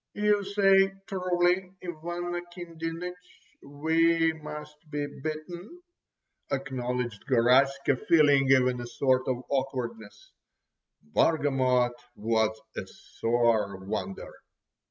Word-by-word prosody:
"You 210 -1 +2
say 195 -1 +4
truly, 180 -1 0
Ivan 175 +1 -5
Akindinich, 175 0 -6 0.5
we 160 +3 +2
must 150 -1 -9
be 145 -1 -2
beaten," 155 - -7 0.7
acknowledged 125 -4 -3
Garaska, 135 +2 +3
feeling 145 -4 +5
even 125 -2 +3
a 120 - -6
sort 130 0 +1
of 125 -1 -1
awkwardness. 125 -6 -4 0.7
Bargamot 130 - +2 0.2
was 110 0 0 0.2
a - - -5
sore 115 -4 0
wonder! 95 0 -5
145 Hz, 90 wpm, -28 LUFS, 125-175 Hz, 0.7 s, feeling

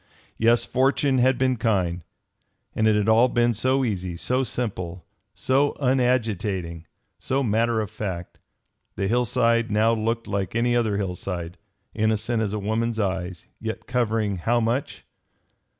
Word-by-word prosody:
Yes, 115 +1 +3
fortune 135 +1 +2
had 130 +1 +3
been 130 -1 +1
kind. 95 -7 0 0.7
And 110 - +1
it 105 -1 +2
all 115 +3 +5
had - - -9
been 120 0 +3
so 130 +4 +1
easy, 90 -6 -3
so 125 +8 0
simple, 95 -8 -4 0.3
so 140 +2 +1
unagitating, 110 - 0 0.3
so 135 +1 -1
matter 115 0 +1
of 105 - -5
fact! 95 -5 -5 0.6
The 95 +1 -1
hillside 115 0 +2
now 110 +2 +3
looked 115 +1 -1
like 100 -1 -3
any 120 +1 +2
other 110 -4 +1
hillside, 90 -3 -4 0.3
innocent 110 +1 0
as 105 -3 -1
a 105 - -2
woman's 110 +3 -1
eyes, 95 -4 -2
yet 110 0 -5
covering 110 -5 0
how 120 +7 +1
much! 120 +4 -2
110 Hz, 140 wpm, -24 LUFS, 100-120 Hz, 0.7 s, all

